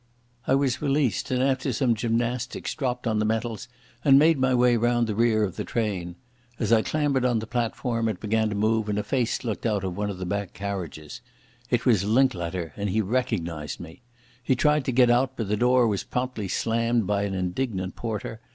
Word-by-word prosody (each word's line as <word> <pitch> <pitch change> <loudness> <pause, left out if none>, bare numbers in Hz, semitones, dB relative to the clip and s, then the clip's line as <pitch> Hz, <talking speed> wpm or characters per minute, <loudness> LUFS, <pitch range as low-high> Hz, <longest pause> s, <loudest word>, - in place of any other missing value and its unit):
I 135 - +4
was 135 -2 0
released, 140 -8 0
and 130 0 +1
after 135 0 +1
some 125 0 +2
gymnastics 115 +2 -2
dropped 125 -4 -3
on 110 -2 +1
the - - +1
metals 110 0 -2 0.4
and 135 -2 +7
made 155 0 +5
my 130 0 +2
way 125 0 +4
round 120 +1 +2
the 110 - -2
rear 110 0 +2
of 95 -4 -3
the - - -2
train. 95 -7 -2 0.4
As 115 -1 +1
I 110 - +5
clambered 145 -1 0
on 125 -2 +2
the 110 - -3
platform 115 0 -1
it 105 - -4
began 110 0 0
to 105 - -3
move, 110 +1 +1
and 105 - -1
a 105 - 0
face 120 +3 -1
looked 110 -4 -3
out 105 -4 0
of 95 -2 -3
one 105 0 -2
of 100 - -5
the 90 - -5
back 100 +1 -3
carriages. 90 -6 -6 0.5
It - - 0
was 110 -6 +4
Linklater 95 - 0
and 100 0 -2
he 105 +4 0
recognised 95 -9 -2
me. 80 -1 -11 0.4
He 130 +2 +1
tried 150 +1 +2
to - - 0
get 125 -1 +5
out, 125 +2 +2
but 110 -4 -3
the 105 - +2
door 125 +2 +4
was 100 -3 -1
promptly 125 -5 -3
slammed 115 +2 0
by 100 +1 0
an 100 -1 -2
indignant 95 +1 -2
porter. 110 0 -5
115 Hz, 205 wpm, -25 LUFS, 100-125 Hz, 0.5 s, and